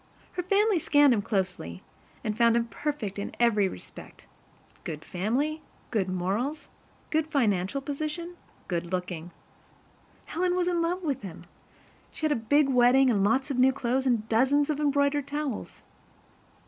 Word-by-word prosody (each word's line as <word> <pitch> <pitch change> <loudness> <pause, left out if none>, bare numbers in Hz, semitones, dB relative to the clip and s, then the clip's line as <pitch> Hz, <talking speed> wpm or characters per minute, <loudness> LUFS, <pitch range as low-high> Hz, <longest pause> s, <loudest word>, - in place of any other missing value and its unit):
Her 360 - -3
family 395 +1 +2
scanned 290 -3 +5
him 215 - +1
closely, 180 - -3 0.4
and 215 - -2
found 235 0 +4
him 235 0 +2
perfect 235 -6 -4
in 200 - -5
every 215 -4 +3
respect 90 - -10 0.6
good 155 -1 -6
family, 265 - -1 0.3
good 200 -6 0
morals, 210 - -2 0.4
good 315 0 +1
financial 230 - 0
position, 310 +5 -4 0.3
good 170 -1 -3
looking. 180 -2 -3 1.0
Helen 360 +2 0
was 360 -1 +1
in 350 -1 +1
love 355 +2 -1
with 285 -6 -1
him. 180 -5 -9 0.7
She 325 - -5
had 310 - +2
a - - +3
big 275 +6 +3
wedding 255 0 +5
and 200 -4 +2
lots 265 +7 +1
of 255 - -1
new 260 +1 +6
clothes 265 0 -1
and 230 -4 +1
dozens 275 +6 +3
of 295 - -3
embroidered 285 -1 +1
towels. 290 -5 -4
260 Hz, 150 wpm, -27 LUFS, 205-300 Hz, 1.0 s, new